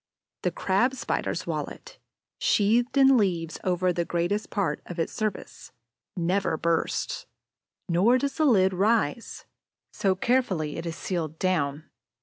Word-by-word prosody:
The - - +1
Crab 235 +8 +1
spider's - - -2
wallet, - - -6 0.4
sheathed 235 +6 +2
in 270 -1 +6
leaves 170 -6 0
over 180 0 +1
the 170 - 0
greater 175 +4 0
part 200 -2 -1
of 175 - -7
its 165 - -2
surface, 215 -10 -5 0.4
never 175 -1 0
bursts; 165 0 -1 0.6
nor 195 +9 +4
does 275 +1 -1
the 310 - +3
lid 190 -8 +4
rise, 210 0 0 0.5
so 190 -2 +1
carefully 190 -9 0
is 165 +1 -5
it 165 - -3
sealed 160 -5 -3
down. 155 -5 -1
185 Hz, 135 wpm, -26 LUFS, 170-225 Hz, 0.6 s, in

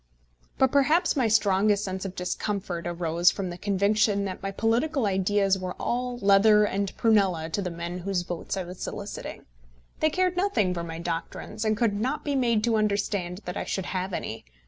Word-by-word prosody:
But 265 -1 +3
perhaps 305 +6 +3
my 255 -5 +2
strongest 205 -1 +3
sense 190 0 -4
of 190 -1 -5
discomfort 180 -1 -3
arose 170 0 +2
from 190 -3 -3
the - - -6
conviction 200 +1 +2
that 190 -1 -5
my 195 - -3
political 235 +7 0
ideas 195 0 +2
were 185 -1 -5
all 245 0 -2
leather 210 0 +5
and 200 -1 -1
prunella 190 -8 +2
to 200 - -1
the 185 - -2
men 170 +1 -5
whose 185 0 -1
votes 175 +2 -4
I 190 - -2
was 180 +1 -10
soliciting. - - -6 0.5
They 310 - +3
cared 365 +2 +1
nothing 235 - +1
for 170 -1 -4
my 165 -1 -6
doctrines, 170 +5 -4
and 215 -1 +1
could 230 -3 +2
not 250 +8 -2
be 290 - 0
made 235 -5 +2
to 230 -1 +2
understand 200 -3 -1
that 180 - -4
I - - -2
should 190 - -3
have 185 +1 -3
any. 115 -10 -5
200 Hz, 190 wpm, -26 LUFS, 180-220 Hz, 0.5 s, leather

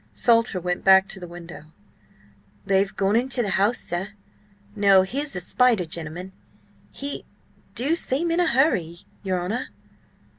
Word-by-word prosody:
Salter 230 -5 +2
went 180 0 -3
back 190 0 +6
to 195 - -7
the 175 - -8
window 175 -2 -11 1.0
"They've 195 0 +1
gone 195 +1 +1
into 250 +1 +1
the 205 - -2
house, 205 +5 +2
sir. 190 +4 -4 0.6
No, 200 -2 +5
here's 275 +9 -3
the 180 - -3
spider 225 +1 +2
gentleman! 170 +2 -6 0.6
He 280 +1 -5 0.5
do 275 +7 +1
seem 330 0 0
in 335 - +1
a 350 - +3
hurry, 190 - +1 0.2
your 185 -2 -1
honour!" 220 +8 -3
195 Hz, 145 wpm, -24 LUFS, 180-250 Hz, 1.0 s, back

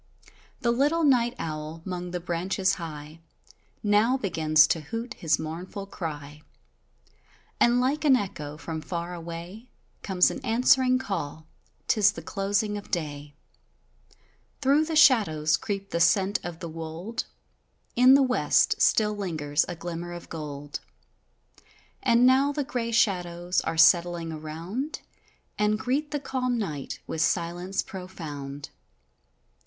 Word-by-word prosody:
The 235 -2 +2
little 290 +7 +2
night 245 -4 +3
owl 155 +1 -5
'mong 180 -1 -5
the 180 - -3
branches 185 +3 0
high, 155 -1 -8 0.6
Now 210 +5 +3
begins 155 -8 +4
to 160 0 0
hoot 230 - -5
his 160 -9 +1
mournful 175 +5 -6
cry, 150 -6 -7 1.2
And 240 +1 +4
like 270 +5 0
an 285 -4 +6
echo 150 -9 -4
from 160 0 -5
far 170 +1 -4
away 170 +6 -8 0.3
Comes 185 -2 +3
an 270 - -7
answering 255 +2 +4
call; 165 - -4 0.4
'tis 205 -1 +4
the - - -8
closing 205 +1 -1
of 205 - -14
day, 145 -4 -4 1.2
Through 285 +4 +3
the 320 0 -3
shadows 200 - +5
creep 195 +2 -4
the 170 - -1
scent 190 +4 +3
of 175 -1 -7
the 170 - -4
wold, 165 +8 -5 0.7
In 255 +2 +7
the 275 - +5
west 255 -1 +2
still 210 -1 +3
lingers 155 -7 -1
a 175 - -5
glimmer 175 +1 -6
of 175 - -9
gold, 145 -2 -6 1.2
And 240 -1 +4
now 265 +2 +5
the 290 0 -2
grey 240 -3 -3
shadows 180 -5 +1
are 165 - -3
settling 170 0 +4
around, 165 - -5 0.6
And 210 0 +2
greet 270 +6 -1
the 295 - -2
calm 255 -3 -1
night 155 - -4
with 160 - -3
silence 175 +3 0
profund. 145 -7 -7
180 Hz, 130 wpm, -26 LUFS, 160-235 Hz, 1.2 s, In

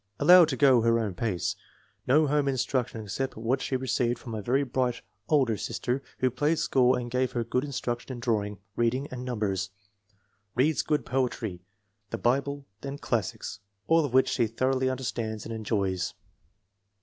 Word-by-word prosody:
Allowed 180 -2 +8
to 130 - -2
go 130 -4 +6
her 115 0 +3
own 110 -4 -1
pace. 95 -2 -1 0.5
No 150 +4 +5
home 145 0 +1
instruction 125 -3 -1
except 105 +7 -3
what 120 +4 0
she 130 - -1
received 125 -2 0
from 120 -2 -8
a 110 - -3
very 130 +7 +1
bright 125 -2 -1 0.3
older 135 -7 +3
sister 125 +6 -2 0.2
who 130 -1 +1
played 150 +6 +1
school 130 -3 +3
and 120 -1 -4
gave 125 0 0
her 120 - 0
good 125 +3 -1
instruction 125 -3 -3
in 120 - -7
drawing, 105 -4 -1 0.2
reading, 125 +4 +1
and 125 0 -5
numbers. 105 -7 -1 0.9
Reads 145 +6 +3
good 150 -1 0
poetry, 120 -8 -2 0.5
the - - -3
Bi 125 +3 +3
ble, 140 0 -6 0.2
and 140 +1 -5
classics, 110 -4 -2 0.3
all 165 0 +4
of 145 - -2
which 130 +1 +4
she 120 -3 +1
thoroughly 130 +3 +1
under 130 0 -3
stands 110 -3 -3
and 115 - -5
enjoys. 100 -4 -1
125 Hz, 175 wpm, -28 LUFS, 115-135 Hz, 0.9 s, Allowed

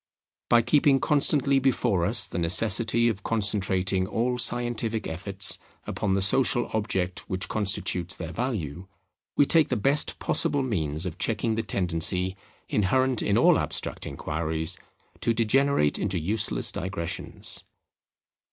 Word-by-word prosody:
By 120 -1 +5
keeping 140 0 +3
constantly 140 -1 +3
before 120 -9 +1
us 105 0 +4
the 85 - -5
necessity 115 +7 +3
of 105 -4 -2
concentrating 95 -3 0
all 125 +4 -1
scientific 120 -2 +1
efforts 95 +4 -2 0.3
upon 95 -2 -2
the 100 - 0
social 120 +3 +2
object 95 -4 -2
which 95 +1 -2
constitutes 95 -4 +1
their 85 -1 -7
value, 95 - -4 0.5
we 145 - +5
take 160 0 +3
the 125 - 0
best 135 +7 +1
possible 140 -2 0
means 80 - -2
of 85 -3 -6
checking 115 0 0
the 115 - -1
tendency 90 -2 0 0.3
inherent 130 +5 +1
in - - +1
all - - +4
abstract - - -3
inquiries 80 +2 -2 0.4
to 115 - 0
degenerate 120 - +1
into 95 -2 -2
useless 105 +6 -1
digressions. 95 -2 -4
105 Hz, 130 wpm, -26 LUFS, 90-120 Hz, 0.5 s, By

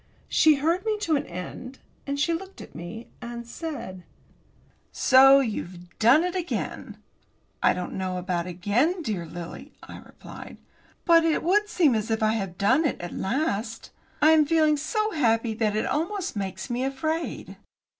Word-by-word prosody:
She 310 -1 +5
heard 330 +6 0
me 435 -1 0
to 330 -6 +1
an 280 - -2
end, 215 +9 -8 0.3
and 280 0 -2
she 335 +3 +1
looked 380 +3 -6
at - - -11
me, 175 +8 -8
and 235 0 -7
said: 235 - -7 0.9
"So 270 +1 +6
you've 180 -7 -6
done 245 +9 +5
it 360 0 -2
again." 355 -2 -4 0.6
"I - - +4
don't 180 - -5
know 185 -1 -3
about 180 -1 -2
again, 230 - 0
dear 190 - -3
Lily," 170 0 -9
I - - -10
replied. - - -12 0.5
"But 335 -1 +6
it 325 -1 +1
would 415 +4 +2
seem 325 - +3
as 220 0 -2
if 220 0 0
I 215 - +3
had 195 -5 -4
done 260 +10 +3
it 295 - -1
at 175 0 -6
last. 230 -1 -2 0.3
I 310 - +7
am 310 -2 +5
feeling 310 -1 +3
so 430 +9 -1
happy 230 - +1
that 215 -1 0
it 215 - 0
almost 365 - -2
makes 190 -2 -4
me 245 +1 -2
afraid." 315 +5 -3
255 Hz, 165 wpm, -25 LUFS, 200-320 Hz, 0.9 s, I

